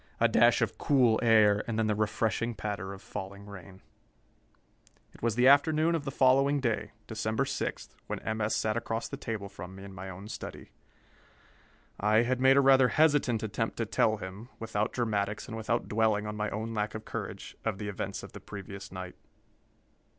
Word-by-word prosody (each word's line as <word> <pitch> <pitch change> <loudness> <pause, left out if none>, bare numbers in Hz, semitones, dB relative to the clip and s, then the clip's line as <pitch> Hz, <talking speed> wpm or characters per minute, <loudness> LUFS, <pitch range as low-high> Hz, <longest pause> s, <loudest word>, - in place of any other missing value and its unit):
A - - +5
dash - - +4
of - - -3
cool 125 -6 +4
air, 105 -3 +5
and 115 -2 -2
then 110 - +2
the 110 - +2
refreshing 110 +2 0
patter 100 -3 -4
of 100 0 -10
falling 100 +1 -7
rain. 95 -2 -12 1.3
It - - -17
was 115 -2 0
the 125 +2 +4
afternoon 155 +4 +5
of 160 -4 -1
the 135 - -2
following 135 +2 +4
day, 120 -5 -1
December 110 +3 -1
6, 135 - -3 0.2
when - - -3
M. 110 0 -3
S. 105 +1 +1
sat 110 -1 0
across 115 0 -2
the - - -6
table 110 -3 -4
from 95 -1 -9
me 95 - -10
in 100 -1 -9
my 95 +1 -7
own 95 +2 -9
study. - - -8 1.3
I 105 +2 +4
had 125 +1 0
made 135 +1 +6
a - - +7
rather 135 -1 +6
hesitant 145 -5 +3
attempt 110 - -2
to - - 0
tell 110 0 +2
him, 100 +4 -8
without 110 -2 -2
dramatics 105 -3 -1
and 115 - -6
without 115 +2 -1
dwelling 110 -1 +1
on 105 0 -4
my 105 0 -1
own 110 +2 -4
lack 105 0 -2
of 110 - -7
courage, - - -6
of 110 -3 -1
the 105 +1 -5
events 100 -1 -4
of - - -9
the - - -9
previous 100 0 -9
night. 90 -1 -7
110 Hz, 190 wpm, -30 LUFS, 100-120 Hz, 1.3 s, a